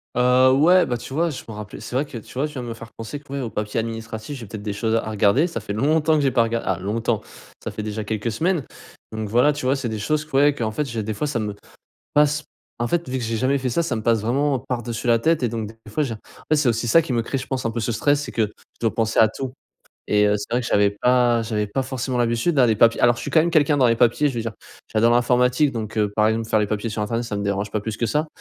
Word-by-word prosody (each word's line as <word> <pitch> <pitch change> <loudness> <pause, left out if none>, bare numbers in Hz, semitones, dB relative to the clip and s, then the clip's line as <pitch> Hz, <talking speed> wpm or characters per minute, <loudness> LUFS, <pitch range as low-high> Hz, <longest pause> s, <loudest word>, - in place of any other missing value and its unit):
Heu, 125 +1 +5
ouais, 175 +7 +5
bah 120 - -2
tu 125 - -9
vois 165 +4 +1
je 145 - -6
me 110 - -7
rappelais 105 0 -8
c'est - - -7
vrai 135 +3 +1
que 135 - -8
tu 110 - -11
vois, 135 +4 -1
tu 150 - -12
viens 130 -4 -5
de - - -6
me 115 - -4
faire 115 0 -11
penser, 115 +6 -7
que 145 -1 -17
ouais, 140 - -2
aux 120 - -3
papiers 105 0 -2
administratifs, 115 +3 -6
j'ai 115 - -8
peut-être 105 +1 -8
des 105 -1 -3
choses 110 +2 0
à 115 -1 -1
regarder 110 - +3
ça 170 - -4
fait 100 - -5
longtemps 155 +7 +2
que 150 - +2
j'ai 135 -2 +2
pas 120 -2 +3
rega 115 0 -1
ah 95 -2 -1
longtemps, 110 +3 -1 0.4
ça - - -4
fait 105 - -6
déjà 110 0 -4
quelques 110 +2 -2
semaines. 165 - 0 0.5
Donc 110 -1 -4
voilà 125 +7 +4
tu 145 -2 -5
vois 130 +2 +3
c'est 130 -4 -3
des 110 -1 -4
choses 150 +8 0
que 155 - -22
ouais 145 +1 +4
qu'en 110 -5 -2
fait 150 +7 -2
j'ai 115 -2 -3
des 110 +1 -3
fois 110 +9 -2
ça 145 -5 -1
me 105 -2 -3 0.6
passe 150 +1 +3 0.3
en 120 0 -1
fait 170 +1 -1
vu 130 +1 -2
que 120 - -3
j'ai 115 0 -2
jamais 130 +5 +1
fait 130 -1 -2
ça, 170 - +1
ça 145 - -1
me 110 - -4
passe 115 0 +2
vraiment 135 +5 +1
par-dessus 120 -3 -4
la 115 -1 +4
tête 160 +3 +2
et 120 - +2
donc 110 -2 -4
des 110 - -12 0.2
fois 150 - +1
j'ai 130 -6 -2
en - - -7 0.3
fait 155 - +5
c'est 145 -3 +2
aussi 115 0 0
ça 165 +9 +6
qui 150 - -4
me 120 -1 +1
crée 135 +4 -3
je 130 - -6
pense 130 -1 -3
un 115 - 0
peu 115 - -3
ce 115 +2 -1
stress 145 +6 +2
c'est - - -7
que 115 - +1
je 105 - -14 0.3
dois 115 -2 0
penser 110 -1 0
à 110 - +6
tout 130 +3 -5 0.6
et 105 0 +4
heu, 105 0 +3
c'est 105 +2 -7
vrai 120 +1 +1
que - - -6
j'avais 100 0 +3
pas 120 +2 +2
j'avais 105 -2 -1
pas 130 +6 -2
forcément 130 -1 -3
l'habitude 120 +7 +1
hein 130 - +6
les 110 -2 +2
papiers 115 +2 +4
alors 120 -1 +4
je - - -6
suis - - -4
quand 160 - +5
même 170 +2 0
quelqu'un 150 -2 +3
dans 130 - +4
les 115 -1 +4
papiers 120 +5 +3
je 140 - -2
veux 120 - -2
dire, 115 0 -4 0.4
j'adore 115 +2 +3
l'informatique 125 +3 +3
donc, 110 -3 -5
heu, 105 -2 +1
par 110 0 +4
exemple 110 0 -1
faire - - +3
les 105 - +2
papiers 105 +2 -2
sur 105 0 -2
internet, 115 +3 -2
ça 105 -3 -4
me 100 - -3
dérange 100 0 -1
pas 105 - -1
plus 105 +1 -4
que 115 - -1
ça. 150 +8 0
120 Hz, 310 wpm, -22 LUFS, 110-135 Hz, 0.6 s, ça